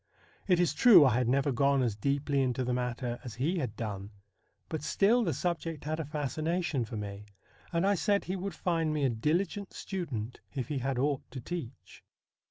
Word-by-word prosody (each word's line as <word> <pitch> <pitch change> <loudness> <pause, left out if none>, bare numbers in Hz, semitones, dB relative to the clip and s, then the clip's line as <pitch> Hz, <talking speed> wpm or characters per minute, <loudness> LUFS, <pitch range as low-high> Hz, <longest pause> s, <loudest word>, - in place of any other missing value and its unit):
It 180 -3 +4
is 175 -3 +2
true 180 - +8
I 130 - +4
had 125 0 +1
never 140 +3 +2
gone 140 +1 +3
as 115 -4 0
deeply 140 +4 0
into 130 -1 0
the 125 0 -1
matter 125 0 -2
as 120 -4 -7
he 160 +9 0
had 125 -7 -3
done, 100 -3 -5 0.6
but 160 - -4
still 210 +10 +3
the 175 - +1
subject 165 -2 -2
had 155 +2 -2
a 160 - -2
fascination 155 0 -1
for 110 0 -6
me, 105 0 -6 0.4
and 170 +2 +1
I 200 - +4
said 200 +1 +1
he 185 - -3
would 190 -1 -4
find 165 -3 0
me 150 -2 0
a 130 - +2
diligent 175 - -1
student 130 - -4 0.2
if 130 -4 -3
he 145 -3 -1
had 135 0 -1
aught 140 +1 +1
to 135 - -7
teach. 135 -3 -7
140 Hz, 195 wpm, -30 LUFS, 125-170 Hz, 0.6 s, true